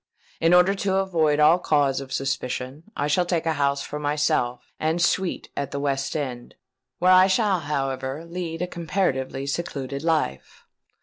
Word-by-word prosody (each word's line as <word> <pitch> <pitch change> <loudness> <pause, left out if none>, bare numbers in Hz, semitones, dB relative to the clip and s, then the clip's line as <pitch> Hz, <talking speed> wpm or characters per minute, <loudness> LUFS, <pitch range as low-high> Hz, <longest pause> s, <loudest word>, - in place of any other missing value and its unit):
In 165 +1 +3
order 180 +2 +5
to 195 -1 -1
avoid 165 -6 +2
all 155 +4 +6
cause 145 -5 +1
of 135 -1 -10
suspicion, 135 +2 -3
I 145 - 0
shall 150 +5 +2
take 175 -2 -1
a 160 - +1
house 140 -1 0
for 150 - -6
myself 145 -4 -1
and 160 +2 0
suite 180 +1 0
at 140 - -3
the 140 - -4
West 140 0 -1
End, 125 -5 -5 0.4
where 180 +1 +4
I 185 +1 +7
shall, 195 -1 +2
however, 135 0 -3
lead 170 -1 -4
a - - -2
comparatively 155 -7 -2
secluded 140 -2 -4
life. 155 - -2
150 Hz, 165 wpm, -24 LUFS, 135-175 Hz, 0.4 s, I